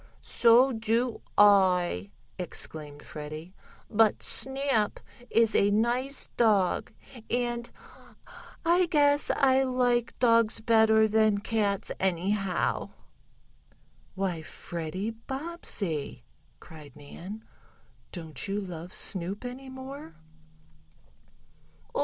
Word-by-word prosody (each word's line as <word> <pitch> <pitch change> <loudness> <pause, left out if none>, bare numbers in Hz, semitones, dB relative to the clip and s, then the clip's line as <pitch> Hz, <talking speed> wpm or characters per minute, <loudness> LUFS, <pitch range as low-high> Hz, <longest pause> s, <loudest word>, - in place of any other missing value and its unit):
"So 240 +3 +5
do 230 +2 0 0.2
I!" 180 - +4 0.3
exclaimed 150 -4 -5
Freddie. 155 +3 -8 0.3
"But 220 -1 +2
Snap 265 -5 -1 0.3
is 225 -1 +3
a 200 - +4
nice 240 +6 0
dog, 205 -6 +2 0.4
and 240 0 -1 1.0
I 350 +2 +4
guess 290 -3 +3
I 265 -1 +4
like 250 -2 +1
dogs 230 -2 +3
better 220 -1 +4
than 215 -1 +3
cats, 205 -1 -1
anyhow." 190 +1 0 1.3
"Why, 190 -4 -2
Freddie 170 +6 -5
Bobbsey!" 225 - -4 0.4
cried 150 -4 -13
Nan. 180 +9 -10 0.7
"Don't 165 -1 -4
you 200 +1 -1
love 180 -2 -7
Snoop 195 +4 -3
any 260 +2 -7
more?" 260 - -9
215 Hz, 85 wpm, -28 LUFS, 180-245 Hz, 1.3 s, So